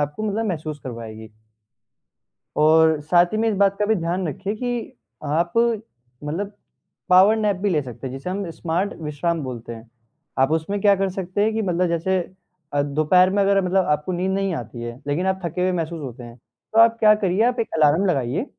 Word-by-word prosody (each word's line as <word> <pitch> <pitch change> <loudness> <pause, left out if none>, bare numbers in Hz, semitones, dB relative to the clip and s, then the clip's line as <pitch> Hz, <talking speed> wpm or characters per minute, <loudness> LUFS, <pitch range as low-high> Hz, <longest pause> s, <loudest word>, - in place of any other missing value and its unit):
आपको 150 +8 -3
मतलब 220 +2 -1
महसूस 155 -4 -4
करवाएगी। 110 -3 -8 1.3
और 160 0 +5
साथ 175 0 +6
ही - - 0
में 225 +1 +1
इस 210 - -1
बात 200 0 +3
का 210 - +2
भी 220 +1 +2
ध्यान 175 +1 -2
रखिए 195 +8 -4
कि 245 0 -4 0.3
आप 165 +4 0 0.7
मतलब 180 +8 -3 0.6
पॉवर 190 +4 +6
नेप 210 -3 +1
भी 200 +1 -1
ले 155 -4 +1
सकते 125 0 -8
हैं, - - -7
जिसे 135 +7 -6
हम 190 -2 -3
स्मार्ट 170 +5 -2
विश्राम 155 +2 -2
बोलते 120 -2 -6
हैं। 115 0 -12 0.5
आप 135 +2 +3
उसमें 160 +6 -1
क्या 200 -1 +5
कर 195 0 0
सकते 185 +1 -3
हैं 220 0 +1
कि 220 - -1
मतलब 180 -2 0
जैसे 175 +3 0 0.6
दोपहर 155 +6 +3
में 200 +1 +1
अगर 195 0 +3
मतलब 185 0 +2
आपको 150 +4 -1
नींद 180 +2 -1
नहीं 195 -1 -1
आती 120 -1 -7
है, 120 +1 -6
लेकिन 155 +6 -1
आप 190 0 0
थके 170 +2 -3
हुए 185 0 +2
महसूस 165 -2 -3
होते 125 -3 -8
हैं 120 0 -11 0.4
तो 225 - +4
आप 230 0 +5
क्या 215 -1 +6
करिए 200 +1 +1
आप 245 -1 0
एक 225 - 0
अलार्म 155 +5 +3
लगाइए। 140 - 0
175 Hz, 200 wpm, -22 LUFS, 150-195 Hz, 1.3 s, साथ